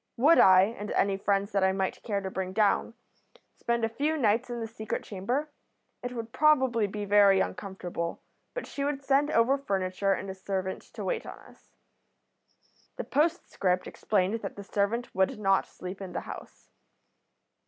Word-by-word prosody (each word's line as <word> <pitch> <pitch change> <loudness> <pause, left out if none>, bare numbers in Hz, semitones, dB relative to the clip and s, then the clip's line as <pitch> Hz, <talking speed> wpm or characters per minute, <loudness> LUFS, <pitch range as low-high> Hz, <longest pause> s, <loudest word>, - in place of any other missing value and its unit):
Would 300 +8 +6
I, 185 0 +8
and 210 0 -4
any 195 0 +2
friends 200 +1 0
that 195 -2 +1
I 190 0 +3
might 190 0 -2
care 205 -3 -2
to 190 -1 -5
bring 185 0 -3
down, 215 +2 +2 0.6
spend 235 -1 0
a - - +1
few 295 +7 -1
nights 230 -1 +2
in 240 0 -4
the 225 - -3
secret 220 -1 -5
chamber? 245 +10 -3 0.5
It 245 0 -5
would 230 -1 -6
probably 260 -8 +3
be 205 +1 -5
very 200 -1 +5
uncomfortable, 180 -3 -4 0.4
but - - -4
she 280 - -5
would 280 -1 -2
send 280 +2 +2
over 255 +5 +3
furniture 195 -5 0
and 195 - -4
a 190 - -4
servant 190 0 -3
to - - -5
wait - - -2
on - - -8
us. - - -19 1.3
The - - -4
postscript 280 - 0
explained 210 +2 0
that 195 - -6
the 200 - -8
servant 205 +5 -1
would 190 +1 +1
not 195 -2 +2
sleep 185 +2 -8
in 190 -2 -7
the - - -2
house. - - -11
205 Hz, 175 wpm, -28 LUFS, 190-245 Hz, 1.3 s, I